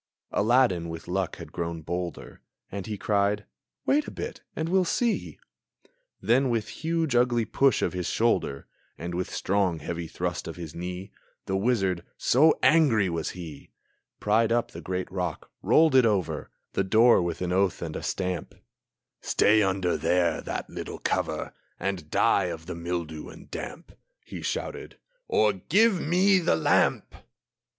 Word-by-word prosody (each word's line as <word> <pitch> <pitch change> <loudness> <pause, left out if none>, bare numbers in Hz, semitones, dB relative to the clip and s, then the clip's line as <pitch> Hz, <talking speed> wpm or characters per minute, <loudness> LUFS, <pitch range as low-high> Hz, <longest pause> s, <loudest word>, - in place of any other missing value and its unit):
Aladdin 105 -6 +3
with 80 0 -7
luck 90 0 -1
had - - -10
grown 85 -1 -4
bolder, 90 +1 -5 0.3
And 100 +1 -5
he 105 -1 -4
cried, 100 0 +1 0.4
"Wait 290 +2 +2
a - - -3
bit, - - -6
and 160 - -2
we'll 185 +2 +3
see!" 230 +6 -1 0.8
Then 130 +3 +2
with 115 -3 -1
huge, 165 -4 -1
ugly 120 -1 +3
push 135 +5 +2
of - - 0
his 90 -2 -3
shoulder, 70 0 0 0.3
And 85 +1 -5
with 90 +1 -2
strong, 95 -3 0
heavy 85 +1 -5
thrust - - -3
of - - -6
his 85 -3 -8
knee, 90 +3 -6 0.3
The 95 - -1
wizard 95 -5 +1
so 155 +6 +4
angry 135 - +4
was 80 -1 -2
he 80 -5 -9 0.5
Pried 110 +2 +2
up 120 0 +1
the 85 - -8
great 90 +2 -4
rock, 90 -1 -4
rolled 160 -1 +4
it 130 -1 +7
over 100 -6 -1 0.2
The 95 - +1
door 110 +3 +5
with 85 -1 -2
an 90 0 -1
oath 95 -2 +2
and 80 -2 -5
a - - -4
stamp; 90 -2 -3 0.7
"Stay 110 +1 +4
there 105 - +3
under 95 -2 0
that 90 -1 0
little - - -6
cover, - - -2 0.3
And 90 -6 -3
die - - +3
of 80 0 -5
the 90 - -5
mildew 85 -2 -4
and - - -14
damp," 170 - -7 0.3
He - - -7
shouted, - - -4 0.3
"or 105 -1 +3
give 195 - +3
me 185 +4 +4
the 165 - +2
lamp!" 80 - +2
95 Hz, 160 wpm, -27 LUFS, 85-120 Hz, 0.8 s, it